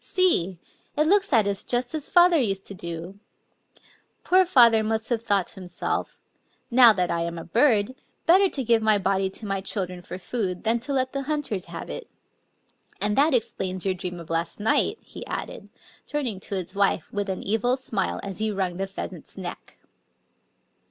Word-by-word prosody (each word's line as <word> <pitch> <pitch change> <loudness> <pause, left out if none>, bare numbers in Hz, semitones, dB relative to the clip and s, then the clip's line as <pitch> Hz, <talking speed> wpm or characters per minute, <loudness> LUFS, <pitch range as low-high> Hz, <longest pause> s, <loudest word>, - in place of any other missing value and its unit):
See! 265 - +2 0.4
it 305 - +3
looks 395 +3 +3
at 225 -6 +4
us 200 -1 -2
just 245 +2 -1
as 305 -2 -3
father 350 -3 +6
used 195 -6 -1
to - - -7
do 170 +1 -7
I... 215 - -32 0.4
Poor 370 +1 +4
father 235 -9 +6
must 220 +1 -1
have 235 -3 0
thought 200 -5 +1
to - - -12
himself, 180 -1 -3 0.3
* - - -42
Now 240 -1 +8
that 180 -4 0
I 170 0 0
am 170 0 -3
a 165 - -6
birdy 225 - +2 0.3
better 380 +3 +5
to 270 - -2
give 230 -1 +3
tny 215 -1 +4
body 195 0 +1
to 205 +3 -6
my 195 -1 -2
children 185 -2 -4
for 180 - -7
food 185 -2 -3
than 230 +1 +2
to 280 +4 -4
let 260 -1 0
the 275 - -2
hunters 280 -11 -2
have - - -7
it.^... - - -7 0.9
And 210 0 0
that 290 0 +4
explains 185 -5 -2
your 190 - +2
dream 180 -1 -6
of 165 -1 -10
last 165 +4 -2
night," 220 +2 +2
he - - -10
added, - - -6 0.2
— - - -28
turning 260 -10 -2
to 200 - -4
his 185 -1 -3
wife 195 -4 0
with 205 -1 -2
an 190 - -3
evil 225 +5 +1
smile 220 -7 -2
as 195 0 -5
he 220 0 0
wrung 190 -4 -2
the 195 +1 -2
pheasant's 195 - -7
neck. - - -8
210 Hz, 195 wpm, -25 LUFS, 190-255 Hz, 0.9 s, Now